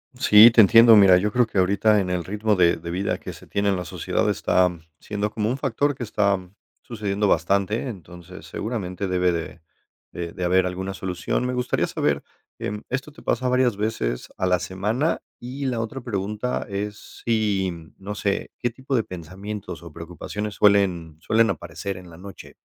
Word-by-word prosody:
Sí, 115 -3 +8
te 115 - +7
entiendo. 115 +2 +8
Mira, 95 -3 +7
yo 105 +3 0
creo 125 0 +3
que 105 - -6
ahorita, 100 +3 +3
en 90 -2 -2
el 90 -1 -1
ritmo 105 +3 0
de 85 -2 +4
de 85 +1 -7
vida, 95 +3 -1
que - - -8
se - - -14
tiene 100 0 0
en 95 - +2
la 90 -1 -4
sociedad, - - -1
está 90 0 +2 0.3
siendo 105 0 -3
como 110 0 -1
un 130 - -1
factor, 140 +3 0
que 125 - -6
está 100 -2 +1 0.4
sucediendo 105 -3 -2
bastante. 100 - +1
Entonces, 90 -2 -11
seguramente, 100 -4 -4
debe 90 -1 +2
de 85 -1 -5 0.5
de 85 -1 -5
de 90 - -6
haber 90 +1 +3
alguna 95 +1 -4
solución. 95 +6 -2
Me 125 - -1
gustaría 125 0 0
saber, 70 -1 -1 0.3
em, 105 0 -4
¿esto 135 +4 -3
te - - -16
pasa, 130 - -1
varias 125 -3 +2
veces 105 - -2
a 95 - -1
la 90 -1 +2
semana? 105 - -1 0.2
Y, 130 +3 -6
la 120 -3 -1
otra 115 +4 -5
pregunta 105 +1 -3
es, 105 +1 -6
si, 105 -5 +1 0.3
no 100 +2 -6
sé. 100 -1 -2
¿Qué 120 - 0
tipo 130 +2 -4
de 115 - +2
pensamientos 95 +1 -8
o 85 - -10
preocupaciones, 90 +6 -6
suelen 90 -6 +2
suelen 115 +5 +2
aparecer 90 +3 -5
en 90 -1 -12
la 80 - -13
noche? 95 +1 -11
100 Hz, 185 wpm, -23 LUFS, 90-110 Hz, 0.5 s, Sí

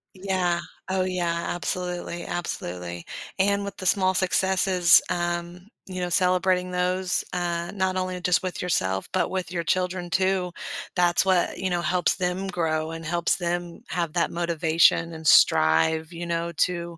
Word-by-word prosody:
Yeah. 185 -2 0 0.3
Oh, 190 -1 +1
yeah, 175 -2 -1
absolutely, 175 0 -3
absolutely. 90 - -5 0.3
And 200 +1 +2
with 200 - -7
the 185 - -7
small 185 0 +3
successes, 185 -1 +4
um, 175 +1 -3 0.2
you 185 -1 -5
know, 175 - -1
celebrating 180 +1 +2
those, 180 0 0
uh, 175 -1 -2
not 190 -1 0
only 185 -1 -2
just 180 +1 +2
with 185 - -4
yourself, 95 - -1
but 185 - 0
with 185 -2 -3
your 170 -2 -2
children 180 0 -1
too, 190 -1 +1 0.4
that's 175 +1 +3
what, 185 -2 +2
you 190 - -2
know, 175 -1 0
helps 175 +2 +1
them 185 +1 -2
grow 160 -3 -1
and 165 0 -7
helps 170 +1 +1
them 175 +1 -3
have 170 -3 -2
that 170 - +1
motivation 165 -1 +2
and 160 0 -9
strive, 160 - +4
you 170 +1 -5
know, 170 0 -2
to, 170 0 -1
175 Hz, 155 wpm, -25 LUFS, 170-185 Hz, 0.4 s, successes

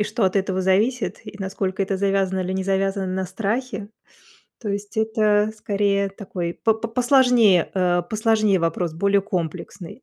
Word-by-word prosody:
И - - -1
что 215 0 -1
от 190 +1 +1
этого 190 -1 0
зависит? 200 +2 +1
И 205 - -10
насколько 190 0 -2
это 195 0 -1
завязано 195 -1 0
или 185 0 -2
не 190 0 -1
завязано 195 0 0
на 185 +1 -2
страхе? 215 +1 -3 0.7
То 215 - -5
есть 205 +2 -5
это, 215 -1 +2
скорее, 200 -1 0
такой 185 -3 -5
по 225 +4 +1
п 225 +1 -5
посложнее, 245 - +4
э, 180 -2 +2
посложнее 215 -3 +2
вопрос, 165 0 -1
более 200 +3 +2
комплексный. 180 - -5
200 Hz, 160 wpm, -22 LUFS, 190-215 Hz, 0.7 s, посложнее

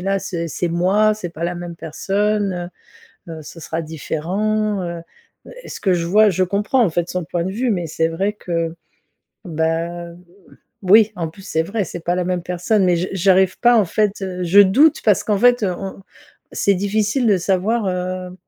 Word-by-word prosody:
là 195 +2 0
ce 170 -3 -4
c'est 175 +3 -2
moi. 195 +5 +2
C'est 180 -5 -6
pas 170 0 -5
la 175 +1 -2
même 175 -1 -7
personne, 195 +1 -2 0.6
heu, 160 -1 -7
ce 165 +3 -11
sera 165 +1 -4
différent», 195 +7 -2
heu, 170 -1 -5 0.5
heu, - - -11
et - - -11
ce - - -7
que 190 -3 +1
je 170 -1 -1
vois, 210 +4 +5
je 185 0 +1
comprends, 205 +7 +1
en - - +1
fait, 175 +1 -1
son 180 -1 -3
point 170 +1 -2
de 190 - -3
vue. 240 +3 -1
Mais 175 -4 -2
c'est 160 +1 0
vrai 195 +5 -1
que, 165 -4 -3 0.7
bah, 165 +1 -2 0.8
oui, 210 +3 +5
en 165 -2 -3
plus 195 +5 -14
c'est 160 -3 -1
vrai 200 +3 -2
c'est 175 - -7
pas 175 +2 -1
la 180 - -1
même 180 -1 -2
personne. 180 +4 0
Mais 180 -1 +3
je 180 +2 -2
j'arrive 190 0 +3
pas, 240 0 +5
en 210 - +4
fait, 205 +3 -1
heu, 185 -1 -4
je 195 +4 +6
doute 280 +11 +4
parce 210 -3 +3
qu'en 210 -2 +1
fait, 245 0 +4
heu, 185 -3 0
on 195 0 -7 0.5
c'est 200 - +2
difficile 210 +6 0
de 205 -3 +4
savoir, 195 +4 0
heu, 180 0 -4
185 Hz, 200 wpm, -19 LUFS, 170-205 Hz, 0.8 s, je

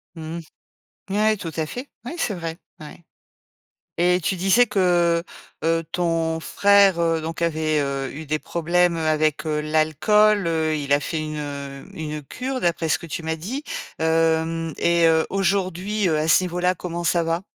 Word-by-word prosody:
Mmh. 160 +1 -6 0.7
Ouais, 215 +2 +2
tout 165 -4 -6
à 160 - 0
fait. 250 - -7 0.2
Ouais, 290 - -5
c'est 225 -10 -1
vrai, 165 -2 -5 0.2
ouais. 155 +2 -11 1.0
Et 180 +1 +3
tu 190 - 0
disais 195 +7 +4
que, 175 -4 +2 0.4
heu, 165 0 +1
ton 165 -2 0
frère, 200 0 +4
heu, 165 -1 +1
donc 165 +1 -5
avait, 155 -2 +1
heu, 140 -1 -2
eu 155 +2 -8
des 155 +1 0
problèmes, 170 +2 +1
heu, - - -3
avec, 155 0 +1
heu, 150 -1 0
l'alcool. 160 +7 +3
Heu, 160 -1 0
il 140 -1 -2
a 145 - +4
fait 155 +2 -3
une, 155 0 -4
heu, 140 -2 -6
une 150 -1 -5
cure 255 - -4
d'après 170 -1 0
ce - - +2
que 170 - -10
tu 165 +1 -5
m'as 160 0 -2
dit. 240 - -5 0.4
Hem 160 0 +1
et 170 -1 +3
heu, 160 0 +4
aujourd'hui, 195 +1 0
heu, 155 - +1
à 155 - 0
ce 165 - +5
niveau-là, 180 +1 0
comment 175 0 -5
ça 170 0 +2
va? 165 +2 -1
165 Hz, 180 wpm, -23 LUFS, 155-180 Hz, 1.0 s, ce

